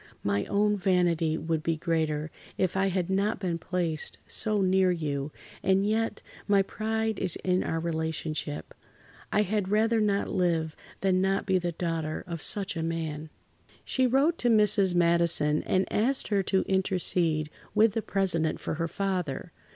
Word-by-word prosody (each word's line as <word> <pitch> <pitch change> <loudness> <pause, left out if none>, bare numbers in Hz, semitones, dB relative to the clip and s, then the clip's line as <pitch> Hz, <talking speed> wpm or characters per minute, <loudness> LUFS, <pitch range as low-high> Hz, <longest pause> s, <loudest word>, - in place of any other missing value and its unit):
My 100 0 0
own 210 +1 +1
vanity 175 -4 +1
would 160 0 -2
be 165 0 -1
greater 155 -2 -1 0.3
if 185 -1 0
I 190 0 +2
had 185 -2 -1
not 195 +3 0
been 175 -4 -2
placed 170 -3 -2
so 215 -1 0
near 190 -1 +3
you, 150 -4 -2 0.3
and 195 0 +2
yet, 225 +2 -1 0.2
my 200 -1 +4
pride 220 +1 -2
is 185 -3 +1
in 185 0 +1
our 165 - -2
relationship. 160 - -3 0.6
I 210 - +3
had 205 -1 -1
rather 220 +2 +2
not 200 -1 +1
live 165 -4 0 0.3
than 185 -1 +2
not 195 +1 +1
to - - -16
be 185 - +4
the 175 -1 -3
daughter 165 -2 -3
of 170 -3 -6
such 195 +3 -2
a 165 - -2
man." 160 -2 -3 0.6
She 260 -1 +2
wrote 280 +7 +2
to 245 - +2
Mrs. 205 -4 +4
Madison 170 -3 +2
and 185 0 +2
asked 255 +6 +1
her 200 -2 +2
to 190 0 +1
intercede 175 -5 +1 0.2
with 215 +1 +5
the 225 - -1
President 180 -7 0
for - - -3
her 165 - 0
father. 180 -5 -3
185 Hz, 165 wpm, -28 LUFS, 160-200 Hz, 0.6 s, with